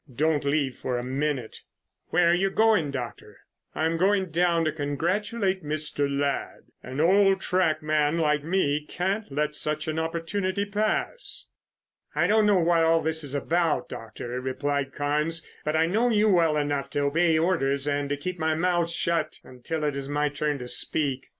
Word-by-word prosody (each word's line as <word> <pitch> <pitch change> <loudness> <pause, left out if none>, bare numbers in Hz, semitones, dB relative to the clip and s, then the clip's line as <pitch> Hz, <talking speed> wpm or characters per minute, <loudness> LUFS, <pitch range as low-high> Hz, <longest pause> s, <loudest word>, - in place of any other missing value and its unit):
Don't 150 +4 +1
leave 140 -2 0
it - - -24
for 125 -1 -2
a 120 - -3
minute." 135 -2 -2 0.5
"Where 170 0 +3
are - - +4
you 190 +2 +2
going, 215 -7 +3
Doctor?" 125 -4 -7 0.4
"I'm 160 +1 0
going 190 0 +2
down 170 0 +2
and 155 - -1
congratulate 185 - -1
Mr. 150 -1 0
Ladd. 140 0 -2 0.2
An 130 +3 -7
old 195 +3 +4
track 180 -5 0
man 155 +1 +1
like 150 -3 +1
me 150 -4 0
can't 190 +4 -3
let 150 +2 -1
such 155 0 -2
an 155 0 -1
opportunity 185 +4 -2
pass." 215 - -2 0.7
"I - - +2
don't 215 0 +4
know 205 -2 +4
what 165 -1 +3
this 160 0 0
is 145 -1 -4
all 140 - -2
about, 170 -2 0
Doctor," 120 +2 -6
replied 140 +1 -2
Carnes, 150 +3 -1 0.2
"but 155 +1 -1
I 160 +1 +4
know 220 +8 +1
you 215 -1 +3
well 165 -5 +3
enough 145 -2 -1
to 145 - -1
obey 160 +3 +2
orders 145 -5 +1
and 145 -1 -1
to 145 - -1
keep 180 +4 -5
my 160 -1 +1
mouth 175 0 +1
shut 170 -2 -1
until 140 +5 -5
it 145 -2 0
is 140 0 -5
my 145 0 +1
turn 145 0 -2
to 125 -2 -7
speak." 135 0 0
155 Hz, 175 wpm, -26 LUFS, 145-175 Hz, 0.7 s, are